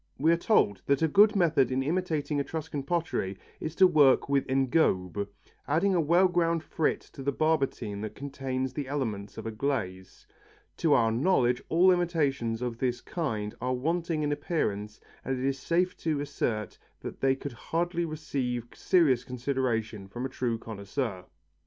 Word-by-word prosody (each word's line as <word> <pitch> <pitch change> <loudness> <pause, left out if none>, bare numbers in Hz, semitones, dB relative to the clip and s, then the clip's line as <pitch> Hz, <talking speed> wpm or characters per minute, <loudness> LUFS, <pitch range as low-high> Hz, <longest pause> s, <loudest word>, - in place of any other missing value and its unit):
We 160 +4 +3
are - - +5
told 105 - +2
that 140 +2 +2
a - - +5
good 205 +7 +5
method 155 -9 +3
in 130 +1 0
imitating 155 -2 -1
Etruscan 155 0 -3
pottery 140 - -2 0.2
is 160 +1 -5
to 190 - +7
work 150 -7 +5
with 140 -1 +1
engobe, 120 - +1 0.4
adding 170 +7 +2
a 175 - +3
well 170 +5 +4
ground 170 -2 +1
frit 155 - 0
to 140 - -9
the 140 +1 0
barbotine 140 -9 0
that 110 0 -5
contains 135 -2 -3
the 140 0 -4
elements 110 -8 -3
of - - -6
a 115 - -3
glaze. 105 -7 -3 0.5
To 160 -3 +3
our 115 -3 +4
knowledge 125 -2 +2
all 180 +3 +5
imitations 140 -10 0
of 120 -2 -4
this 125 -2 0
kind 110 -11 -3
are 130 +1 0
wanting 165 +3 -1
in 145 - 0
appearance 105 - -2 0.2
and 130 0 -2
it 130 - -2
is 135 0 0
safe 175 +6 +1
to 155 -3 -1
assert 110 -8 -3 0.2
that - - -7
they 135 0 +3
could 135 0 -7
hardly 170 +7 -2
receive 130 -7 -3
serious 140 -9 +3
consideration 120 -5 -2
from 120 +6 -5
a - - -3
true 125 -3 -2
connoisseur. 100 -2 -4
135 Hz, 165 wpm, -28 LUFS, 120-160 Hz, 0.5 s, to